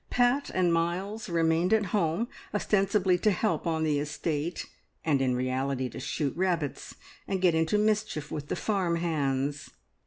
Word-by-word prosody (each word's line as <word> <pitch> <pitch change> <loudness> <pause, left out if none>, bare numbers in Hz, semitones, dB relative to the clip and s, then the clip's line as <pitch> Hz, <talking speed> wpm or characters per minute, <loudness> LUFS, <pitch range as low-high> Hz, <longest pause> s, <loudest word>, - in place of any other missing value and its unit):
Pat 245 +3 +2
and 180 -2 +3
Miles 185 +6 -1
remained 165 +1 +2
at 215 -2 +3
home, 190 +3 +1 0.3
ostensibly 195 -3 +2
to 215 - +3
help 210 -1 0
on 160 -1 0
the 150 -2 +1
estate, 150 +2 -3 0.4
and 145 -4 +2
in 130 -1 +2
reality 130 +1 -1
to - - -8
shoot 140 +1 -2
rabbits 170 -6 -1 0.3
and 195 - -1
get 180 -2 +4
into 160 +5 +2
mischief 210 -8 0
with 145 -1 -4
the - - -2
farm 190 -5 0
hands. 145 -4 -1
170 Hz, 155 wpm, -28 LUFS, 145-195 Hz, 0.4 s, get